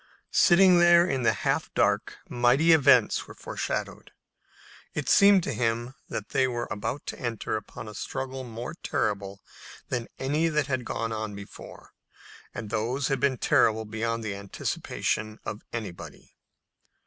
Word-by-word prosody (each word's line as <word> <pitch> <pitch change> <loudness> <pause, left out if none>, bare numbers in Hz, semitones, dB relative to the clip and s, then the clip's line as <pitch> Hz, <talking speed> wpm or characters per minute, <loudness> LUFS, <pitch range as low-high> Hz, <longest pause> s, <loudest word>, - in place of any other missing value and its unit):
Sitting 180 0 +6
there 175 0 +6
in 135 -6 -1
the 115 - +4
half - - 0
dark - - +1
mighty 125 +7 +3
events 140 -7 +4
were - - -11
foreshadowed. - - -5 0.8
It - - -3
seemed 200 -2 +6
to - - -2
him 120 +1 -1 0.2
that 105 - -5
they 130 -1 +2
were 120 -1 -3
about 105 +8 -4
to - - -6
enter 115 -3 -3
upon 110 +2 -7
a 105 - -8
struggle 130 +3 -5
more 120 0 -6
terrible 100 - -3 0.5
than 120 -2 -2
any 150 +5 0
that 150 -2 +1
had 130 -3 -2
gone 110 -2 -3
before, 100 0 -11 0.6
and 110 -3 -7
those 120 +6 -1
had 135 -2 0
been 135 -1 +1
terrible 110 -1 +2
beyond 115 +1 -3
the 105 -2 -3
anticipation 105 +2 -3
of 105 0 -5
anybody. 110 -7 -8
120 Hz, 145 wpm, -27 LUFS, 110-135 Hz, 0.8 s, Sitting